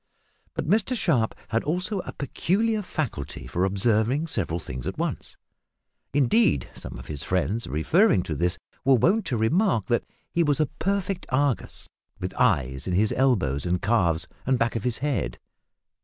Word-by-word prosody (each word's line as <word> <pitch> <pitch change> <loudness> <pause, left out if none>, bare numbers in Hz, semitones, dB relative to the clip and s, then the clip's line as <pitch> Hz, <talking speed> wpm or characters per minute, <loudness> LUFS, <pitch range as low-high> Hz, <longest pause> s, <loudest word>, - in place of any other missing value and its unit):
But - - -3
Mr 220 +7 +2
Sharp 125 - +1
had 115 0 0
also 180 +6 -1
a - - -5
peculiar 210 - 0
faculty 75 - -4
for 60 +9 -1
observing 110 - +2
several 95 - -2
things 65 -5 -6
at - - -4
once. - - -3 0.7
Indeed, 120 - +3
some - - -8
of - - -9
his 75 -2 -5
friends, 95 +5 -1
referring 100 - +3
to 80 - -4
this, 85 +4 0 0.3
were 135 0 +5
wont 185 - +2
to 125 - 0
remark 140 - +2
that 120 - +1 0.3
he 170 - +1
was 150 -2 +2
a 155 - +4
perfect 195 +5 -2
Argus, 135 -1 -1 0.3
with 90 - -4
eyes 70 - +1
in 90 - 0
his 105 +4 +2
elbows 95 - +2
and 90 0 0
calves 90 -7 +2 0.2
and 130 0 +2
back 115 0 0
of 115 - -2
his 125 -2 0
head. 130 - -1
120 Hz, 165 wpm, -26 LUFS, -, 0.7 s, were